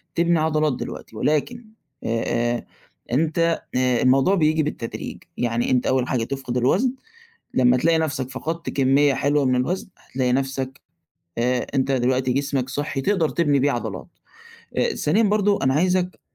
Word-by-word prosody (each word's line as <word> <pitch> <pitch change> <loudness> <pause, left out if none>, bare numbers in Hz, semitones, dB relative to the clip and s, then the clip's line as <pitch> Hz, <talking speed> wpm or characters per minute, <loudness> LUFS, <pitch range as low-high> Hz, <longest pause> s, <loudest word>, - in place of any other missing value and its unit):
تبني 170 0 +2
عضلات 155 -2 +1
دلوقتي، 115 - -7
ولكن 155 - -1 0.4
آآ، 120 +1 -1 0.5
أنت 160 +6 +1 0.4
آآ، 125 -1 +2
الموضوع 135 +9 +4
بييجي 155 -2 +2
بالتدريج، 135 -6 -5 0.2
يعني 120 0 0
أنت 125 -1 +2
أول 130 -1 +1
حاجة 120 -3 0
تفقد 135 -1 -4
الوزن، 195 - +2 0.6
لمّا 125 -1 +4
تلاقي 160 +5 +2
نَفسَك 140 -5 -2
فقدت 165 +6 -4
كمية 135 +1 +3
حلوة 145 +2 +1
من 130 -1 +2
الوزن، 175 +11 -1 0.2
هتلاقي 125 -1 0
نَفسَك 135 0 -2 0.6
آآ، 125 +1 +1
أنت 135 0 +1
دلوقتي 130 0 +1
جسمَك 135 -1 -1
صحّي، 145 0 -3
تقدر 170 +1 +1
تبني 145 -4 +1
بيه 140 +2 +2
عضلات. 110 -6 -4 0.7
آآ، - - +1
ثانيًا 200 +10 +2
برضه 205 -1 +2
أنا 130 0 +3
عايزك 180 +3 +1
135 Hz, 145 wpm, -23 LUFS, 125-160 Hz, 0.7 s, الموضوع